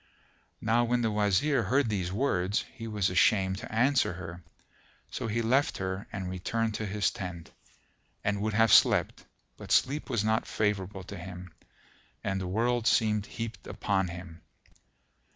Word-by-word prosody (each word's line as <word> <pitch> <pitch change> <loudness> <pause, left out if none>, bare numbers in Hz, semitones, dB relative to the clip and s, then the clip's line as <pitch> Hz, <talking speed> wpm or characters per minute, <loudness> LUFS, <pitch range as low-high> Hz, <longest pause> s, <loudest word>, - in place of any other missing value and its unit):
Now 115 +2 +3
when 120 0 +1
the 110 - +1
Wazir 105 +7 +2
heard 130 +6 +2
these 95 -5 -2
words, 100 -3 0
he 115 -3 -7
was 105 -4 0
ashamed 95 0 +3
to - - -8
answer 130 -1 +2
her; 85 0 -8 0.7
so - - -3
he 115 +2 -1
left 130 +5 +2
her 95 +1 -4
and 95 -2 -4
returned 110 +5 -2
to 110 0 -3
his 100 +1 0
tent, 90 -4 -7 0.7
and 100 0 0
would 110 0 -1
have 115 -1 +5
slept; - - +4 0.3
but - - -9
sleep 145 +3 +2
was 115 -5 0
not 110 +1 +1
favourable 100 -2 -1
to - - -8
him 90 -1 -9 0.7
and 95 0 -1
the 90 - -3
world 115 +4 +1
seemed 105 -1 +2
heaped 115 -2 -6
upon 95 -3 0
him. 85 -1 -9
105 Hz, 155 wpm, -29 LUFS, 95-115 Hz, 0.7 s, have